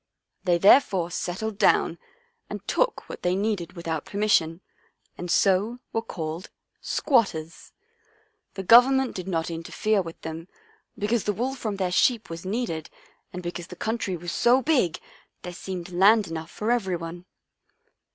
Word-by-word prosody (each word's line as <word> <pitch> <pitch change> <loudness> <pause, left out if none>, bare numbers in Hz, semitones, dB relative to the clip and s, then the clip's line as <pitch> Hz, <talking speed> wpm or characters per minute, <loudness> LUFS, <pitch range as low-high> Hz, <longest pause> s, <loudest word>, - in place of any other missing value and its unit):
They 175 -2 +3
therefore 190 -3 +5
settled 200 +5 -4
down - - +3 0.5
and - - -7
took - - 0
what - - -8
they 180 +1 +1
needed 195 -4 -2
without 165 -3 -4
permission, 190 -5 +1 0.5
and 175 - -7
so 200 +6 +2 0.2
were 225 - 0
called 165 -4 -6 0.2
' - - -49
squatters.' 180 - 0 0.8
The 195 - -4
Government 255 +5 +6
did 185 -1 -5
not 165 -2 -1
interfere 195 +5 0
with 165 -2 -9
them, 160 +1 -7 0.5
because 215 +2 0
the 210 - +1
wool 245 +7 -2
from 220 -6 -4
their 185 -2 -1
sheep 230 +2 +2
was 165 +2 -7
needed 190 -7 -3 0.4
and 180 0 -7
because 175 0 -5
the 180 - -10
country 220 -2 -2
was 175 +1 -5
so 250 +6 +3
big 255 - +2 0.4
there 180 - -6
seemed 180 0 -6
land 200 +4 +5
enough 160 0 -6
for 215 +3 -2
everyone. 175 -6 -2
185 Hz, 150 wpm, -25 LUFS, 170-220 Hz, 0.8 s, Government